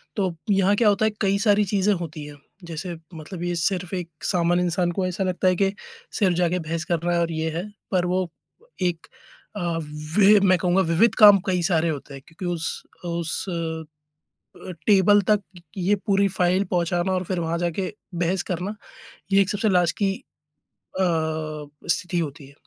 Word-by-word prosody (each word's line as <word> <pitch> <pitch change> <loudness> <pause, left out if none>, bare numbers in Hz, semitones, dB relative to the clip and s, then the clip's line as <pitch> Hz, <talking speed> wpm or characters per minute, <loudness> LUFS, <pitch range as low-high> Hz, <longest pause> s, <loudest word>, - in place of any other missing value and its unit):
तो 190 -4 0 0.2
यहाँ 195 +1 +3
क्या 215 -1 +4
होता 205 +2 +2
है, 220 - +2
कई 200 0 +2
सारी 210 -1 +4
चीज़ें 200 +1 +2
होती 160 -4 -5
हैं। 145 0 -10 0.3
जैसे 170 +1 -5 0.2
मतलब 165 +3 -7
ये 175 0 -1
सिर्फ़ 180 +2 -1
एक 175 -2 -4
सामान्य 175 -1 +2
इंसान 175 0 0
को 185 +1 -1
ऐसा 185 +2 -2
लगता 185 0 0
है 185 - +4
के 195 +1 +2 0.5
सिर्फ़ 185 -4 +3
जाके 180 0 +1
बहस 165 +1 -3
करना 170 +1 +1
है 170 - +2
और 165 0 0
ये 160 0 -1
है। 185 +4 -4 0.2
पर 180 -2 +2
वो 180 -1 0 0.5
एक 175 -2 -1 0.5
अ, - - -3 0.6
वि 205 0 +7
मैं 185 -2 +4
कहूँगा 180 +2 +2
विविध 175 +7 +3
काम 205 -2 +9
कई 180 -2 +1
सारे 170 -2 +2
होते 145 -2 -5
हैं 135 - -9
क्योंकि 170 +2 -9
उस 165 -1 -3 0.2
उस 170 +1 -2
अ 165 -2 -3 0.9
अ, - - -3 0.2
टेबल 205 0 +6
तक 210 -1 +4 0.4
ये 190 +3 +2
पूरी 200 0 +3
फाइल 185 +1 +1
पहुँचाना 175 +1 0
और 185 0 0
फिर 185 0 -2
वहाँ 165 0 -1
जाके 175 +3 -2 0.2
बहस 175 +2 0
करना, 185 +4 -3 0.6
यह 195 0 +6
एक 195 - 0
सबसे 210 +1 0
लास्ट 175 -4 +2
की 195 -2 +1 0.9
अ, - - +3 0.9
स्थिति 180 +1 0
होती 145 -3 -5
है। 140 - -17
180 Hz, 185 wpm, -24 LUFS, 170-195 Hz, 0.9 s, काम